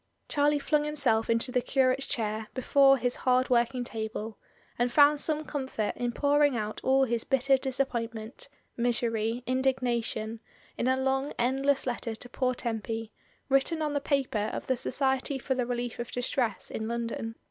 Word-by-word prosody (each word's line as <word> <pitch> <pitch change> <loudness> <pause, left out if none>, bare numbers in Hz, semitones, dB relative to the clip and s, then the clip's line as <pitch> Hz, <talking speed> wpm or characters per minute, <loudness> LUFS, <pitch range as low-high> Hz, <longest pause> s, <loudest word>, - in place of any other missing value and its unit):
Charlie 290 0 +2
flung 295 +1 +1
himself 280 -8 +1
into 230 +2 +1
the 250 - +2
curate's 260 +1 +1
chair 215 -1 -2
before 270 +1 +5
his 245 0 -1
hard 255 0 +2
working 245 +1 +2
table, 220 -1 -5 0.4
and 240 0 +2
found 290 +2 +6
some 310 0 -1
comfort 260 -8 -3
in 245 0 -2
pouring 285 0 +3
out 215 -1 -4
all 270 +1 +4
his 235 -3 0
bitter 270 +1 +3
disappointment, 245 -3 -3 0.3
misery, 235 -1 0
indignation, 245 -4 -1 0.4
in 240 - -1
a 260 0 +3
long 265 +1 0
end 260 +3 0
less 280 -1 +3
letter 240 -2 -3
to 245 +2 -11
poor 255 0 0
Tempy, 225 -2 -4 0.4
written 280 +4 +2
on 300 -1 -1
the 285 - 0
paper 255 -8 0
of - - -5
the 260 - +1
Society 265 +2 0
for 265 +1 -1
the 250 -2 -1
Relief 245 -1 -3
of 240 - -5
Distress 245 -1 -2
in 220 - -3
London. 230 -1 -3
250 Hz, 165 wpm, -29 LUFS, 230-270 Hz, 0.4 s, found